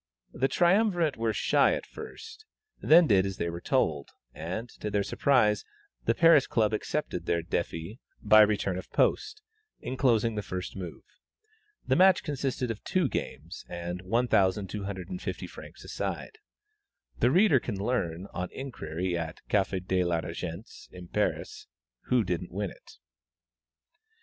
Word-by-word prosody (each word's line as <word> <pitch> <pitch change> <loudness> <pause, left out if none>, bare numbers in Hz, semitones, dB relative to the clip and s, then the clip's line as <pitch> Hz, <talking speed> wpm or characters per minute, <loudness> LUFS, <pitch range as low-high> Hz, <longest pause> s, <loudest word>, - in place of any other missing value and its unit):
The 135 - +1
triumvirate 175 -1 +2
were 115 0 0
shy - - +3
at - - -6
first, 445 -1 -10 0.4
then 165 +3 +7
did 100 -8 +4
as 95 -1 -4
they 85 - -2
were 85 +1 -7
told, 80 - 0 0.2
and, 90 +9 -5
to 105 - -3
their 100 -1 +1
surprise, 105 -5 +2 0.4
the - - +2
Paris 165 -3 +6
Club 110 -1 +1
accepted 105 - -3
their 85 -1 +1
défi 85 +5 -3 0.2
by 110 0 +7
return 100 -3 +2
of - - -10
post, 430 0 0 0.4
enclosing 120 -4 +1
the 105 - -2
first 90 -2 -5
move. 90 -3 -7 0.8
The - - +2
match 185 0 +5
consisted 135 -5 -2
of 110 - -7
two 180 -7 +1
games, - - -5
and 85 +1 -5
1,250 100 - -1
francs - - -12
a - - -12
side; 440 - -4 0.8
the - - +4
reader 190 -8 +5
can 115 -3 -4
learn, 95 -5 -2
on 90 0 -3
inquiry 95 -10 -4
at 80 0 -5
Café 95 -2 +1
de 95 0 +1
la 85 -1 0
Régence 85 +4 -7
in 90 -1 -11
Paris, - - -2 0.4
who 125 -2 +2
didn't 90 -2 -3
win 100 0 -3
it. - - -16
105 Hz, 145 wpm, -28 LUFS, 90-130 Hz, 0.8 s, then